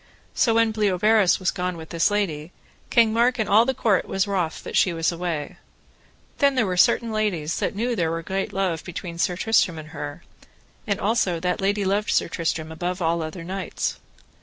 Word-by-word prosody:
So 230 Hz, -2 st, +2 dB
when 230 Hz, -1 st, +3 dB
Bleoberis 210 Hz, -1 st, +3 dB
was 185 Hz, -, 0 dB
gone 180 Hz, -1 st, -3 dB
with 160 Hz, -1 st, -10 dB
this 170 Hz, +4 st, +2 dB
lady, 180 Hz, -6 st, -2 dB, 0.4 s
King 230 Hz, -2 st, +4 dB
Mark 240 Hz, +2 st, +3 dB
and 220 Hz, -, -1 dB
all 220 Hz, +3 st, +5 dB
the 265 Hz, +1 st, -1 dB
court 210 Hz, -6 st, +2 dB
was 195 Hz, +1 st, 0 dB
wroth 185 Hz, -5 st, -2 dB
that -, -, -6 dB
she 180 Hz, -, +3 dB
was 165 Hz, +1 st, 0 dB
away. 170 Hz, -4 st, -4 dB, 0.8 s
Then 280 Hz, -1 st, +3 dB
were 225 Hz, -7 st, +1 dB
there 180 Hz, -, -2 dB
certain 230 Hz, +5 st, +3 dB
ladies 195 Hz, -8 st, -1 dB
that -, -, -2 dB
knew 230 Hz, +4 st, -1 dB
that 240 Hz, -, -1 dB
there 165 Hz, -3 st, +1 dB
were 165 Hz, 0 st, -3 dB
great 195 Hz, +3 st, -3 dB
love 185 Hz, -4 st, -1 dB
between 170 Hz, -1 st, -7 dB
Sir 180 Hz, -, +1 dB
Tristram 200 Hz, -6 st, +2 dB
and 155 Hz, 0 st, -9 dB
her, 150 Hz, 0 st, -7 dB, 0.6 s
and 200 Hz, -1 st, 0 dB
also 195 Hz, -5 st, +1 dB
that 180 Hz, +1 st, -1 dB
lady 200 Hz, +1 st, +1 dB
loved 200 Hz, +2 st, 0 dB
Sir -, -, +2 dB
Tristram 160 Hz, -2 st, -3 dB
above 175 Hz, +3 st, -3 dB
all 165 Hz, -1 st, 0 dB
other 160 Hz, +2 st, -6 dB
knights. 185 Hz, +2 st, -3 dB
185 Hz, 200 wpm, -24 LUFS, 170-215 Hz, 0.8 s, all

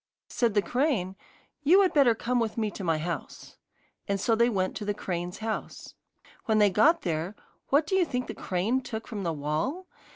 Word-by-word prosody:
Said 230 Hz, -4 st, 0 dB
the 205 Hz, -, +3 dB
crane: 245 Hz, -, 0 dB, 0.5 s
'You 355 Hz, +7 st, +6 dB
had 370 Hz, -, +1 dB
better 270 Hz, -6 st, +5 dB
come 245 Hz, +2 st, 0 dB
with 225 Hz, -1 st, -2 dB
me 215 Hz, -2 st, 0 dB
to 200 Hz, -, -7 dB
my 165 Hz, -3 st, +1 dB
house,' 170 Hz, +2 st, -6 dB, 0.5 s
and 200 Hz, -1 st, 0 dB
so 225 Hz, -, +1 dB
they 235 Hz, +2 st, +4 dB
went 185 Hz, -4 st, -1 dB
to -, -, -5 dB
the 205 Hz, 0 st, -2 dB
crane's 175 Hz, -2 st, -4 dB
house. 220 Hz, 0 st, -5 dB, 0.5 s
When 220 Hz, -1 st, +2 dB
they 205 Hz, -2 st, +5 dB
got 290 Hz, -, +4 dB
there, 170 Hz, +3 st, -2 dB, 0.3 s
what 290 Hz, +3 st, +3 dB
do 320 Hz, -, -4 dB
you 380 Hz, -, +4 dB
think 250 Hz, -6 st, -2 dB
the -, -, -6 dB
crane 205 Hz, +8 st, -1 dB
took 225 Hz, -3 st, -6 dB
from 215 Hz, -3 st, -5 dB
the 170 Hz, -3 st, -1 dB
wall? 155 Hz, -, -2 dB
220 Hz, 200 wpm, -28 LUFS, 185-250 Hz, 0.5 s, You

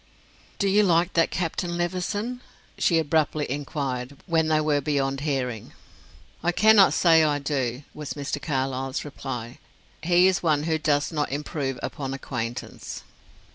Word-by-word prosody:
"Do 200 Hz, -, +1 dB
you 200 Hz, +2 st, +4 dB
like 175 Hz, -2 st, +3 dB
that 165 Hz, -, +3 dB
Captain 175 Hz, 0 st, -2 dB
Levison?" 205 Hz, +8 st, -2 dB, 0.4 s
she 170 Hz, -, +3 dB
abruptly 155 Hz, -1 st, +1 dB
inquired, 135 Hz, -1 st, -4 dB
when 165 Hz, -3 st, +2 dB
they 155 Hz, -1 st, +3 dB
were 150 Hz, -2 st, +1 dB
beyond 135 Hz, -1 st, 0 dB
hearing. 130 Hz, -6 st, -3 dB, 0.7 s
"I 175 Hz, -, +1 dB
cannot 215 Hz, +1 st, +6 dB
say 165 Hz, -2 st, +5 dB
I 150 Hz, -2 st, +2 dB
do," 140 Hz, -3 st, -2 dB
was 150 Hz, -2 st, -6 dB
Mr. 145 Hz, 0 st, -4 dB
Carlyle's 135 Hz, -2 st, -2 dB
reply. 125 Hz, -4 st, -6 dB, 0.4 s
"He 175 Hz, +2 st, +4 dB
is 190 Hz, -1 st, +3 dB
one 150 Hz, -3 st, +2 dB
who 160 Hz, 0 st, 0 dB
does 145 Hz, 0 st, +1 dB
not 150 Hz, -4 st, -1 dB
improve 140 Hz, -2 st, -3 dB
upon 135 Hz, -2 st, -4 dB
acquaintance." 120 Hz, -3 st, -5 dB
150 Hz, 140 wpm, -25 LUFS, 135-170 Hz, 0.7 s, cannot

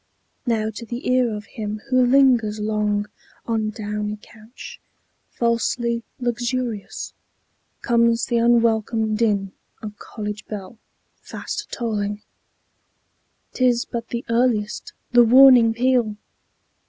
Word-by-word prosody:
Now 220 Hz, -2 st, 0 dB
to 220 Hz, +2 st, -8 dB
the 240 Hz, +3 st, -6 dB
ear 250 Hz, -2 st, +3 dB
of 210 Hz, 0 st, -6 dB
him 215 Hz, -1 st, -5 dB
who 255 Hz, 0 st, +4 dB
lingers 245 Hz, -5 st, +3 dB
long 210 Hz, -1 st, -1 dB, 0.4 s
On 220 Hz, -2 st, -1 dB
downy 210 Hz, -1 st, -4 dB
couch, 220 Hz, +3 st, -13 dB, 0.5 s
"falsely 235 Hz, 0 st, 0 dB, 0.2 s
luxurious," 240 Hz, -2 st, -3 dB, 0.7 s
Comes 235 Hz, -1 st, +2 dB
the 235 Hz, -1 st, 0 dB
unwelcome 225 Hz, -2 st, +2 dB
din 205 Hz, -4 st, 0 dB, 0.3 s
of 210 Hz, -1 st, -8 dB
college 210 Hz, -1 st, -7 dB
bell 210 Hz, +1 st, -8 dB, 0.4 s
Fast -, -, -6 dB
tolling...... 210 Hz, -3 st, -3 dB, 1.3 s
"'T 255 Hz, -, -2 dB
is 240 Hz, -2 st, +3 dB
but 230 Hz, -1 st, -5 dB
the 235 Hz, 0 st, -5 dB
earliest, 230 Hz, -3 st, 0 dB, 0.2 s
the 245 Hz, 0 st, +7 dB
warning 250 Hz, -1 st, +7 dB
peal!" 235 Hz, -2 st, +1 dB
230 Hz, 110 wpm, -22 LUFS, 210-240 Hz, 1.3 s, the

